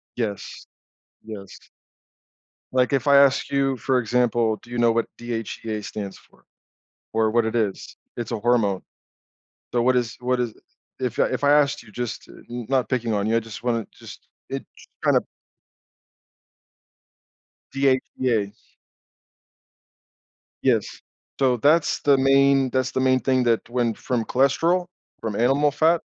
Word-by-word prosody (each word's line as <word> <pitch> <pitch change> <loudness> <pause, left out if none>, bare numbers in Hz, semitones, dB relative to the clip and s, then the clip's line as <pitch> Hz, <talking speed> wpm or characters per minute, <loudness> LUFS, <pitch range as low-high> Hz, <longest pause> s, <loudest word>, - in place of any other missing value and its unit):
Yes. 105 -5 -5 0.6
Yes. 100 -3 -10 1.0
Like, 130 +2 +2
if 135 +1 0
I 140 0 +7
ask 140 -1 +4
you, 135 -1 +1
for 130 +3 +1
example, 115 -1 +1
do 120 - -19
you 120 - -5
know 120 -1 +4
what 115 0 +1
DHEA 115 -2 -5
stands 105 -2 -6
for, - - -24 0.7
or 110 -1 +2
what 115 -1 +2
it 110 - -2
is? 105 -4 -2 0.2
It's 120 -1 -5
a 115 - -2
hormone. 105 -5 +1 0.9
So, 120 - +1
what 130 +1 +3
is 120 -2 0
what 125 0 0
is 120 -3 -1 0.5
if 125 -2 -3
I - - +6
if - - -3
I 145 - +5
asked 145 -3 +3
you 110 -3 -16
just 120 -1 -5
n 120 -2 -9
not 130 -2 +1
picking 120 -4 -1
on 100 -1 0
you, 115 - +1
I - - +4
just 115 0 -10
want 115 -3 -1
to - - -26
just - - -12 0.2
it - - -4
j - - -15 0.2
kinda - - +4 2.5
DHEA. 130 -5 0 2.1
Yes. - - +3 0.5
So 130 -3 +3
that's 150 +5 +3
the 140 -1 +4
main 135 0 +4
that's 130 0 0
the - - -1
main 130 0 +3
thing 130 0 +2
that 115 -2 +1
went 120 -2 0
from 120 -3 -2
cholesterol, 165 +7 +2 0.3
from 110 -3 -3
animal 135 +5 +3
fat, 160 +3 +3
125 Hz, 150 wpm, -23 LUFS, 115-135 Hz, 2.5 s, I